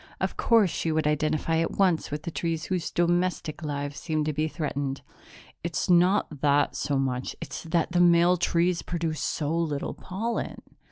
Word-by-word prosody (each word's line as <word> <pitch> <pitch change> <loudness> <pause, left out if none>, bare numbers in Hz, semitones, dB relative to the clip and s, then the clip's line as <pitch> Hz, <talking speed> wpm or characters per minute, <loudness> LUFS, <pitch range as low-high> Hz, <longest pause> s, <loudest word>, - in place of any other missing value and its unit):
Of - - -1
course 220 -7 +4
she 165 - -1
would 155 0 0
identify 155 +2 +1
at 165 0 0
once 185 -5 +2
with 150 +1 -4
the 170 - -4
trees 165 -1 -2
whose 180 -3 -2
domestic 175 -2 0
lives 145 -1 -4
seemed 155 -2 -1
to 155 - -1
be 155 +2 0
threatened. 140 -4 -3 0.6
"It's 170 +2 -1
not 175 -4 +3
that 145 0 +3
so 140 - -1
much. 130 -1 -2
It's 145 -4 -6
that 165 +1 0
the 175 0 +3
male 175 +1 +5
trees 175 +1 +1
produce 165 -3 -3
so 155 +1 -1
little 155 -4 -1
pollen." 225 +6 -4
165 Hz, 170 wpm, -27 LUFS, 150-175 Hz, 0.6 s, male